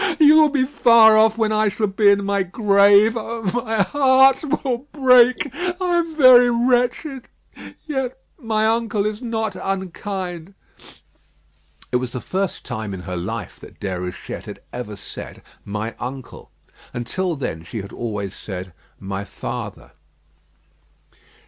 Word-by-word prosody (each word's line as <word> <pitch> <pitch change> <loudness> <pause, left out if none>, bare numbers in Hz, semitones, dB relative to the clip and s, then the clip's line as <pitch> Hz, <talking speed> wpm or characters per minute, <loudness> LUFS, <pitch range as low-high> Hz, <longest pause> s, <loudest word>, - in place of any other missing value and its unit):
You 300 -1 +7
will 310 -1 +6
be 280 -2 +1
far 230 -5 +5
off 220 +1 +4
when 220 -2 +1
I 215 0 +2
shall 210 +2 -1
be 200 +1 +3
in 200 0 +2
my 200 0 0
grave. 200 +2 +4
Oh! 230 0 -5 0.2
my 220 -3 0
heart 265 +1 +4 0.2
will 255 +1 -2
break. 255 -1 +4
I 355 +2 -1
am 330 -2 -4
very 255 -4 +7
wretched; 245 +2 0 0.6
yet 265 -4 -3 0.2
my 220 -4 -1
uncle 225 -2 0
is 215 +2 -3
not 225 -3 -3
unkind." 190 -1 -5 1.4
It 125 - +2
was 125 -1 -5
the 125 - -4
first 190 +7 -3
time 110 -4 -5
in 90 - -8
her 90 +1 -6
life 100 +3 -6
that - - -15
Déruchette 90 -2 -6
had - - -10
ever 120 -4 -6
said - - -10 0.2
"my 105 +3 -4
uncle." 130 +1 -8 0.5
Until 165 +9 -3
then 80 - -5
she 100 +5 -7
had 100 - -11
always 105 -4 -5
said 90 -3 -8 0.3
"my 95 0 -5
father." - - -7
215 Hz, 140 wpm, -20 LUFS, -, 1.4 s, You